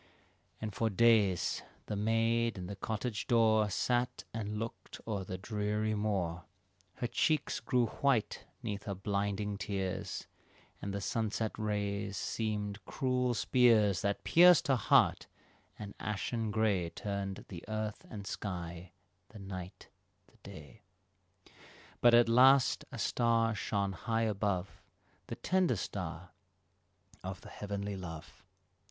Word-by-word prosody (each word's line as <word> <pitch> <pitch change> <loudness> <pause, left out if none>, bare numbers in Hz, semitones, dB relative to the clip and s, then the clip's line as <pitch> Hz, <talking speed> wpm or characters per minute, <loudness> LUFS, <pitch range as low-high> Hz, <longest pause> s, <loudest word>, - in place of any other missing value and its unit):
And 110 -2 -4
for 115 +2 0
days 105 -4 +3 0.2
the 105 - -3
maid 115 +2 +1
in 90 - -5
the 100 +2 -6
cottage 110 +2 -3
door 110 -2 +4
Sat 120 +5 0
and 105 -1 -3
looked 115 +2 -6
o'er 100 -4 -2
the 95 0 -5
dreary 105 +2 -1
moor, 95 -5 -1 0.5
Her - - -3
cheeks 155 +5 +1
grew 125 -2 +2
white 125 0 0 0.2
'neath 100 -3 -4
her 100 - -3
blinding 100 +1 -2
tears, 95 -1 -3 0.6
And 100 - -3
the 100 0 -3
sunset 110 +1 -1
rays 100 -2 -2
seemed 105 -1 -3
cruel 125 0 0
spears 110 -8 +4
That 100 0 -1
pierced 175 -2 +6
her 135 - +5
heart; 120 - +3 0.5
and 105 -1 -7
ashen 110 +2 -2
gray 105 -5 +1
Turned 100 0 -4
the 85 -4 -8
earth 110 0 -3
and 100 -2 -7
sky, 90 -3 -5 0.4
the 110 - -12
night, 95 -2 -8 0.4
the - - -27
day; 80 +8 -12 1.2
But 120 -1 +7
at 120 0 +6
last 130 +3 +5
a - - -7
star 115 -1 +2
shone 100 -1 -1
high 115 +5 -1
above 100 -3 -1 0.5
The 115 - -5
tender 180 +3 +1
star 90 -3 -5 0.9
of 95 0 -6
the - - -11
heavenly 100 0 -4
love. 80 -4 -9
105 Hz, 130 wpm, -33 LUFS, 100-115 Hz, 1.2 s, But